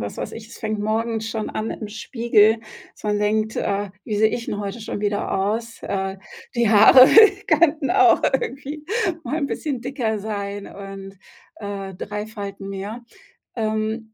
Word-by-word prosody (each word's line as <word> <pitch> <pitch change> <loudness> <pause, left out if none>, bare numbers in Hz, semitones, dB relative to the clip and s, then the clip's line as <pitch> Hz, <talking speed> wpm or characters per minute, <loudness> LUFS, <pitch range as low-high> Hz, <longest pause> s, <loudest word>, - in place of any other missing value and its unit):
was 100 -1 -5
weiß - - -5
ich, 220 -1 -9
es - - -12
fängt 215 -1 -3
morgens 220 +1 -1
schon 220 -2 -3
an 215 +1 -3
im 215 - -6
Spiegel, 220 0 +2 0.3
dass - - -21
man 210 -1 +1
denkt: 215 +1 0
„Äh, 200 0 -1
wie 210 - -2
sehe 215 +1 +4
ich 230 +1 -4
denn 205 - -3
heute 205 +3 -5
schon 215 -2 -5
wieder 205 -1 -1
aus?“ 220 +4 -2
Äh, 195 -1 -3 0.4
die 235 -2 +2
Haare 225 +5 +8 0.4
könnten 310 -2 +3
auch 370 -2 +5
irgendwie 275 +3 -2 0.4
mal 260 +5 -2
'n 285 - 0
bisschen 280 -3 -3
dicker 240 -4 -2
sein 200 -1 -5
und, 195 0 -9 0.4
äh, 200 -2 -6
3 210 +3 -5
Falten 200 -2 -7
mehr. 200 +4 -6 0.5
Ähm, 220 0 -2
215 Hz, 165 wpm, -22 LUFS, 205-235 Hz, 0.5 s, Haare